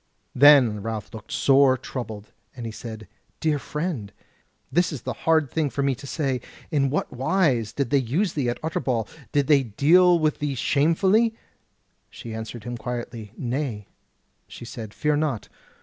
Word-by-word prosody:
Then 125 -6 +6
Ralph 110 +1 -5
looked 110 -2 -10
sore 135 -1 +4
troubled, 115 -5 -7 0.2
and 120 -2 -7
he 115 - -4
said: 110 -1 -8 0.3
"Dear 155 -3 +1
friend, 150 - -4 0.6
this 175 +6 +2
is 145 -7 -6
the - - -3
thing - - -19
hard 160 -4 +3 0.2
for 140 - -1
me 140 -1 +2
to 135 +3 -9
say. 135 -4 -1 0.3
In 140 -3 +2
what 140 - -2
wise 130 - +1
did 140 0 -2
they 140 - +4
use 160 - 0
thee 135 -5 0
at 120 - -3
Utterbol? 125 -8 -1 0.2
Did 145 -1 +2
they 145 -1 +5
deal 165 - +4
with 155 -2 0
thee 145 -2 -2
shamefully?" 190 - +2 0.7
She 115 - -9
answered 110 0 -6
him 120 +1 -5
quietly: 120 -3 -6
"Nay," 120 -5 -3 0.6
she - - -10
said, 110 -2 -7
"fear 150 +6 0
not! 145 -7 -2
135 Hz, 165 wpm, -24 LUFS, 115-150 Hz, 0.7 s, Then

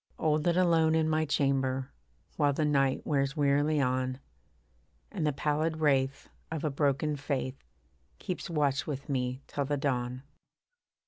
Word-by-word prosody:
Old 155 0 +1
and 170 0 +3
alone 165 -3 +4
in 160 -1 +2
my 155 0 +1
chamber, 135 -2 0 0.4
While 145 -2 +2
the 155 +2 0
night 135 -2 +1
wears 140 0 0
wearily 145 +1 +2
on, 130 0 0 0.9
And 170 -7 -1
the - - +3
pallid 155 +3 0
wraith 135 -3 +1 0.2
of 160 -2 -4
a 155 - 0
broken 145 +1 +1
faith 135 -2 -3 0.5
Keeps 185 0 -5
watch 145 -4 0
with 140 -2 -5
me 130 0 -2
till 140 - -3
the 145 +1 -1
dawn. 125 -2 -2
145 Hz, 145 wpm, -30 LUFS, 135-155 Hz, 0.9 s, alone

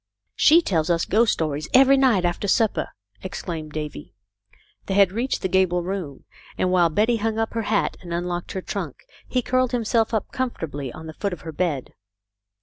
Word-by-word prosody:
" - - -54
She 335 +3 +7
tells 165 - 0
us 170 -1 +2
ghost 220 +3 +3
stories 155 -1 -3
every 270 +1 +7
night 250 -9 +3
after 175 +3 -1
sup 220 +2 +3
per," - - -2 0.3
exclaimed 165 -4 -6
Davy. 150 -1 -6 0.7
They 190 - -1
had 200 -2 +5
reached 235 +6 -2
the - - +2
gable 180 -1 +2
room, 175 -7 -5 0.3
and, 180 - +1
while 175 -2 +4
Betty 220 +8 +2
hung 220 0 -1
up 225 0 -1
her 230 - -1
hat 210 -2 +1
and 175 -2 -9
unlocked 175 0 -3
her 190 - -4
trunk, 175 -10 -5 0.2
he 250 -1 0
curled 255 0 +1
himself 230 -1 +1
up 220 -3 -2
comfortably 155 - -4
on 160 - -10
the 160 - -7
foot 200 +3 -3
of 175 - -8
her 160 - -7
bed. 155 -5 -2
190 Hz, 195 wpm, -23 LUFS, 165-225 Hz, 0.7 s, She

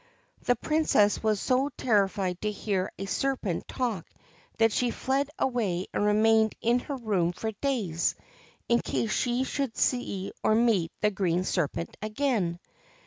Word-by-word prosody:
The 245 - +3
Princess 270 -7 +2
was 215 -2 +1
so 260 +5 +1
terrified 195 -5 +1
to 215 - 0
hear 200 -2 -2
a 195 - -4
serpent 210 -3 -1
talk 230 -9 -2 0.5
that 225 0 +4
she 245 +3 +1
fled 270 +4 -1
away 205 -8 0
and - - 0
remained 220 +1 +4
in 240 +2 +2
her 280 +3 -5
room 195 -8 0
for 220 +4 -3
days, 210 - -1 0.5
in 235 0 +4
case 220 - -2
she 245 +1 +1
should 270 -2 -3
see 200 -6 0
or 215 - +3
meet 220 -8 +2
the 210 - +3
green 185 -3 0
serpent 170 -2 -2
again. 215 -6 -1
215 Hz, 145 wpm, -28 LUFS, 195-245 Hz, 0.5 s, that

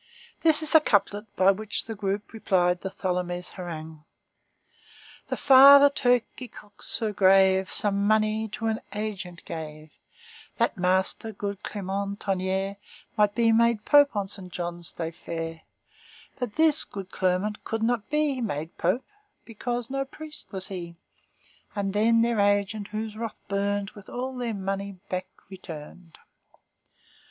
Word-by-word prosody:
This 315 -1 +4
is 310 - +1
the 320 - +8
couplet 205 -3 +1
by 190 +1 +5
which 215 +2 -4
the 225 - -5
group 205 0 -3
replied 180 -5 +1
to 190 - -3
Tholomyès' 180 -1 -3
harangue:— 160 -4 -8 1.3
"The - - -2
father 280 +1 +9
turkey 250 -1 0
cocks 205 -2 -13
so 220 -3 -1
grave 190 -1 +4
Some 200 -1 +1
money 215 0 +2
to 225 - -4
an 220 0 0
agent 195 -5 -5
gave, 155 -2 -7 0.7
That - - +1
master 190 +4 0
good 200 -1 -5
Clermont 200 0 -4
Tonnerre 190 0 -1 0.4
Might 210 -2 +3
be 230 -1 +4
made 230 -1 +3
pope 285 -4 +5
on 200 -1 -1
Saint 190 -2 -10
Johns' 175 -1 -5
day 165 -1 -4
fair. 165 -1 -6 0.8
But 245 -4 -4
this 315 -1 +4
good 195 -2 -8
Clermont 190 +3 -1
could 225 0 -3
not 235 -2 0
be 300 -3 +1
Made 160 -7 -4
pope, 185 +10 +1 0.4
because 240 +2 -4
no 275 0 0
priest 305 +3 -10
was 190 -2 -6
he; 175 -3 -6 0.8
And 195 -1 -1
then 230 +2 +4
their 235 -2 +1
agent, 205 +1 +1
whose 215 0 -5
wrath 225 0 -5
burned, 200 0 -1
With 205 -1 -14
all 255 +2 -4
their 240 -3 -3
money 195 0 -3 0.2
back 185 0 -3 0.2
returned." 170 -2 -10
205 Hz, 145 wpm, -26 LUFS, 185-225 Hz, 1.3 s, father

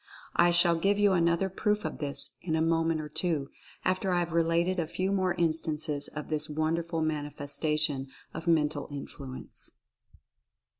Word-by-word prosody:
I 175 - +6
shall 175 -1 +5
give 200 +4 +2
you 205 -1 +4
another 170 +1 +3
proof 210 +1 0
of 155 - -4
this 140 -2 -5
in 160 -3 -1
a 160 - +2
moment 165 0 +2
or 150 - -6
two, 150 -2 -1 0.3
after 185 +1 +1
I 180 - +3
have 175 -1 0
related 170 +2 +2
a 165 - 0
few 185 +4 -1
more 185 -2 +1
instances 155 -3 0
of 150 0 -7
this 155 0 +1
wonderful 160 +2 0
mani 150 -2 -1
festation 145 -1 0 0.2
of 165 +1 -6
Mental 150 -3 +2
Influence. 140 -2 -6
165 Hz, 160 wpm, -29 LUFS, 150-175 Hz, 0.3 s, I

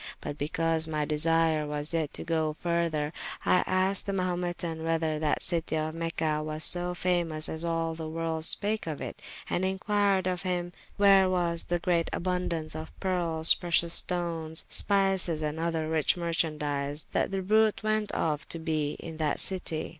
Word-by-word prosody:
But 145 - -5
because 160 +2 0
my 155 -1 -1
desyre 160 0 +2
was 150 +2 -3
yet 160 -3 -1
to - - -3
goe 160 -2 0
further, 165 -2 -1 0.3
I 180 - +4
asked 185 +2 +1
the 200 - -1
Mahumetan 175 -3 -2
whether 160 -1 0
that 155 -1 0
citie 165 -2 0
of 155 0 -2
Mecha 160 -2 -1
was 155 0 -1
so 180 0 +4
famous 170 -4 0
as 160 +1 -4
all 165 -1 -1
the 160 -1 -6
world 160 0 -3
spake 210 +2 +2
of 155 -3 -4
it: - - -7 0.3
and 180 - -1
inquired 195 0 +1
of 180 -1 -1
him 175 -2 -2 0.3
where 195 -2 +6
was 170 -2 -1
the 175 - 0
great 170 -1 0
aboundaunce 175 -3 -2
of 155 0 -8
pearles, 170 -4 +4
precious 170 -1 +1
stones, 165 -3 0
spices, 195 -5 +2
and 150 +1 -3
other 165 -1 -1
rich 160 +1 +1
merchandies 150 -4 -2
that - - 0
the 195 -1 -3
bruite 215 +2 +2
went 215 -1 0
of 150 -3 -1
to - - -1
be 155 -3 -1
in 160 -1 -8
that 155 -2 0
citie. 180 -4 -1
165 Hz, 170 wpm, -28 LUFS, 155-180 Hz, 0.3 s, where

